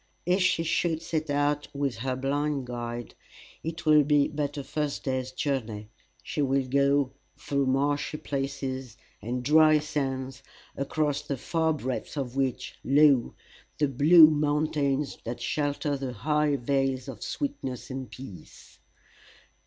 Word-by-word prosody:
If 180 Hz, +3 st, +2 dB
she 170 Hz, -2 st, +2 dB
should 165 Hz, 0 st, 0 dB
set 160 Hz, -2 st, -2 dB
out 145 Hz, +1 st, +1 dB
with 140 Hz, -4 st, -1 dB
her 130 Hz, +2 st, -2 dB
blind 140 Hz, +1 st, -1 dB
guide, 120 Hz, -1 st, -5 dB, 0.5 s
it 165 Hz, +1 st, -5 dB
will 150 Hz, -1 st, +6 dB
be 145 Hz, 0 st, +3 dB
but 145 Hz, -1 st, -3 dB
a 140 Hz, -, -3 dB
first 150 Hz, 0 st, -3 dB
day's 130 Hz, -1 st, -2 dB
journey 115 Hz, -7 st, -3 dB, 0.3 s
she 150 Hz, -, -3 dB
will 135 Hz, -1 st, +1 dB
go 140 Hz, 0 st, +2 dB, 0.3 s
through 140 Hz, -1 st, -1 dB
marshy 145 Hz, +3 st, 0 dB
places 135 Hz, -4 st, -4 dB, 0.2 s
and 125 Hz, +3 st, -3 dB
dry 155 Hz, +2 st, +6 dB
sands, 135 Hz, -3 st, -3 dB, 0.3 s
across 145 Hz, +1 st, -1 dB
the 145 Hz, -2 st, -4 dB
far 160 Hz, +5 st, 0 dB
breadth 130 Hz, 0 st, -4 dB
of 130 Hz, -3 st, -3 dB
which, 135 Hz, -2 st, -2 dB
lo! 140 Hz, -3 st, +4 dB, 0.4 s
the 150 Hz, -, +2 dB
blue 150 Hz, +5 st, +8 dB
mountains 150 Hz, -2 st, 0 dB
that 120 Hz, +1 st, -5 dB
shelter 145 Hz, 0 st, -1 dB
the 135 Hz, -2 st, -4 dB
high 150 Hz, +5 st, +1 dB
vales 135 Hz, 0 st, 0 dB
of 125 Hz, -6 st, -8 dB
sweetness 140 Hz, -, -4 dB
and 130 Hz, -1 st, -5 dB
peace." 100 Hz, -11 st, -12 dB
140 Hz, 135 wpm, -27 LUFS, 130-150 Hz, 0.5 s, blue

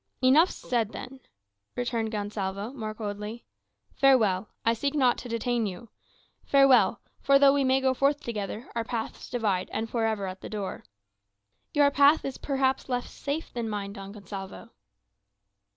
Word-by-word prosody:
"Enough 300 Hz, +8 st, +6 dB
said 230 Hz, -3 st, -2 dB
then," 265 Hz, +1 st, -8 dB, 0.6 s
returned 235 Hz, -3 st, -1 dB
Gonsalvo, 205 Hz, +1 st, -3 dB
more 215 Hz, -5 st, -5 dB
coldly. 210 Hz, +1 st, -6 dB, 0.5 s
"Farewell; 215 Hz, -8 st, +3 dB, 0.2 s
I 230 Hz, -, +4 dB
seek 280 Hz, +5 st, -2 dB
not 255 Hz, -4 st, +3 dB
to 245 Hz, -, -8 dB
detain 230 Hz, 0 st, 0 dB
you. 200 Hz, +5 st, -8 dB, 0.5 s
Farewell; 275 Hz, -2 st, +5 dB, 0.2 s
for 275 Hz, 0 st, +5 dB
though 275 Hz, 0 st, +6 dB
we 285 Hz, -1 st, +2 dB
may 260 Hz, 0 st, +3 dB
go 260 Hz, -1 st, +2 dB
forth 280 Hz, +2 st, +2 dB
together, 220 Hz, -2 st, -5 dB
our 230 Hz, -, -1 dB
paths 225 Hz, -1 st, -5 dB
divide, 210 Hz, -7 st, -1 dB
and 220 Hz, +1 st, -2 dB
for 225 Hz, 0 st, -1 dB
ever, 215 Hz, -3 st, -1 dB
at 185 Hz, 0 st, -6 dB
the -, -, -7 dB
door." 205 Hz, -3 st, -5 dB, 0.9 s
"Your 290 Hz, -1 st, +5 dB
path 285 Hz, +3 st, +5 dB
is 270 Hz, -2 st, -5 dB
perhaps 270 Hz, -1 st, 0 dB
less 245 Hz, -1 st, -2 dB
safe 290 Hz, +3 st, -4 dB
than 235 Hz, -2 st, -3 dB
mine, 200 Hz, -1 st, -4 dB
Don 195 Hz, -1 st, -8 dB
Gonsalvo." 195 Hz, -1 st, -9 dB
235 Hz, 155 wpm, -27 LUFS, 210-270 Hz, 0.9 s, Enough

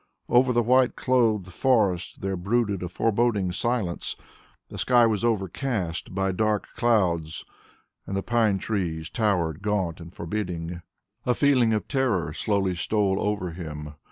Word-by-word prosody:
Over 125 Hz, +1 st, +4 dB
the 120 Hz, -1 st, +2 dB
white 130 Hz, +2 st, +3 dB
clothed 110 Hz, -8 st, +1 dB
forest 100 Hz, -6 st, +1 dB
there 95 Hz, 0 st, -1 dB
brooded 100 Hz, +1 st, 0 dB
a 90 Hz, -, -3 dB
foreboding 105 Hz, 0 st, +1 dB
silence; 110 Hz, -3 st, -1 dB, 0.5 s
the -, -, -8 dB
sky 120 Hz, -2 st, +5 dB
was 110 Hz, -2 st, 0 dB
overcast 95 Hz, -4 st, -2 dB
by 95 Hz, 0 st, +1 dB
dark 105 Hz, +2 st, 0 dB
clouds 90 Hz, -9 st, +1 dB, 0.6 s
and 100 Hz, -, -2 dB
the 95 Hz, -, -2 dB
pine 115 Hz, -4 st, +2 dB
trees 85 Hz, -6 st, -3 dB
towered 90 Hz, -8 st, 0 dB
gaunt 95 Hz, -5 st, -1 dB
and 85 Hz, 0 st, -10 dB
forbidding. 85 Hz, -2 st, -4 dB, 0.5 s
A 125 Hz, -, +3 dB
feeling 130 Hz, -5 st, +3 dB
of 110 Hz, -1 st, -1 dB
terror 105 Hz, -, 0 dB
slowly 95 Hz, +1 st, 0 dB
stole 95 Hz, +2 st, 0 dB
over 105 Hz, -4 st, -1 dB
him. 75 Hz, -3 st, -7 dB
100 Hz, 140 wpm, -25 LUFS, 90-115 Hz, 0.6 s, sky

